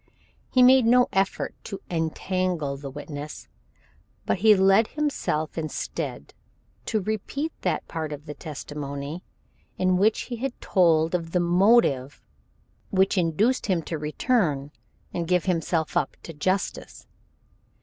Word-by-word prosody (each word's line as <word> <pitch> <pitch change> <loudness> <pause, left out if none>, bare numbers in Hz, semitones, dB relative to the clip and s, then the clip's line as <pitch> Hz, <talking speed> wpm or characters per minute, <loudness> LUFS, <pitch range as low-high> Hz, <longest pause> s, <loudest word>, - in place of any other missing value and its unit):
He 255 - +5
made 255 -1 +7
no 250 +1 +5
effort 195 0 0
to 195 - -6
entangle 170 -2 -1
the 140 0 -7
witness, 145 +1 -8 0.8
but - - 0
he 215 +1 +6
led 195 +3 +5
him 300 0 -1 0.4
instead 155 -2 -4 0.5
to 220 - +1
repeat 220 - -3
that - - -1
part 160 -2 -4
of 150 0 -7
his 150 -2 -8
testimony 145 +1 -6 0.5
in 185 0 +2
which 215 +3 +3
he 240 - -6
had 255 +1 -4
told 165 -3 +3
of 165 -2 -2
the 180 - +3
motive 175 - +3 0.7
which 190 +1 +2
induced 195 +9 +1
him 180 -5 +1
to 160 -1 -4
return 150 - 0 0.4
and 170 -1 -2
give 180 -1 +2
himself 165 -3 0
up 140 - 0
to 165 - -8
justice. 185 +6 -2
180 Hz, 130 wpm, -25 LUFS, 155-210 Hz, 0.8 s, made